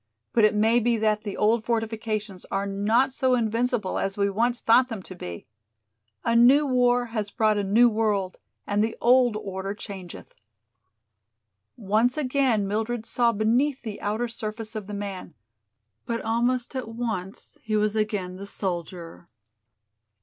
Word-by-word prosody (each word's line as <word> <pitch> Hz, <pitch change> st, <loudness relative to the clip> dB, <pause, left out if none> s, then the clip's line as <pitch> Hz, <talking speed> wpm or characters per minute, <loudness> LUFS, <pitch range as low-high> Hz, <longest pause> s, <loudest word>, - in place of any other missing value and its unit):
But 225 Hz, -2 st, +5 dB
it 210 Hz, -, +2 dB
may 225 Hz, +3 st, +4 dB
be 235 Hz, 0 st, +1 dB
that 215 Hz, -1 st, +1 dB
the 205 Hz, -2 st, -6 dB
old 220 Hz, +2 st, +2 dB
fortifications 220 Hz, -3 st, -3 dB
are 195 Hz, +1 st, -2 dB
not 205 Hz, +7 st, +1 dB
so 260 Hz, -1 st, +2 dB
invincible 230 Hz, -2 st, 0 dB
as 195 Hz, +1 st, -2 dB
we 200 Hz, 0 st, +1 dB
once 240 Hz, +4 st, 0 dB
thought 245 Hz, +3 st, +4 dB
them 220 Hz, -6 st, -6 dB
to 185 Hz, -, -10 dB
be. 90 Hz, -, -8 dB, 0.8 s
A 230 Hz, -, +2 dB
new 260 Hz, +6 st, +6 dB
war 245 Hz, -2 st, +2 dB
has 210 Hz, -3 st, -2 dB
brought 215 Hz, -1 st, +1 dB
a -, -, 0 dB
new 220 Hz, +5 st, +5 dB
world 210 Hz, -4 st, 0 dB, 0.3 s
and 205 Hz, +1 st, +1 dB
the 225 Hz, -, -2 dB
old 245 Hz, -2 st, +4 dB
order 195 Hz, -1 st, -5 dB
changeth." 190 Hz, -4 st, -9 dB, 1.4 s
Once 225 Hz, +5 st, +1 dB
again 255 Hz, -7 st, +1 dB
Mildred 220 Hz, +3 st, -2 dB
saw 235 Hz, 0 st, +2 dB
beneath 240 Hz, +6 st, +1 dB
the 215 Hz, -3 st, -6 dB
outer 215 Hz, +4 st, -1 dB
surface 220 Hz, 0 st, -6 dB
of 210 Hz, -3 st, -5 dB
the 210 Hz, -, -5 dB
man, 200 Hz, -3 st, -6 dB, 0.7 s
but 230 Hz, -1 st, -1 dB
almost 240 Hz, +3 st, 0 dB
at 255 Hz, -3 st, -3 dB
once 220 Hz, -5 st, -5 dB
he 215 Hz, -2 st, -2 dB
was 210 Hz, 0 st, +1 dB
again 205 Hz, -4 st, -2 dB
the 200 Hz, +1 st, -8 dB
soldier. 175 Hz, -3 st, -5 dB
220 Hz, 155 wpm, -25 LUFS, 200-240 Hz, 1.4 s, new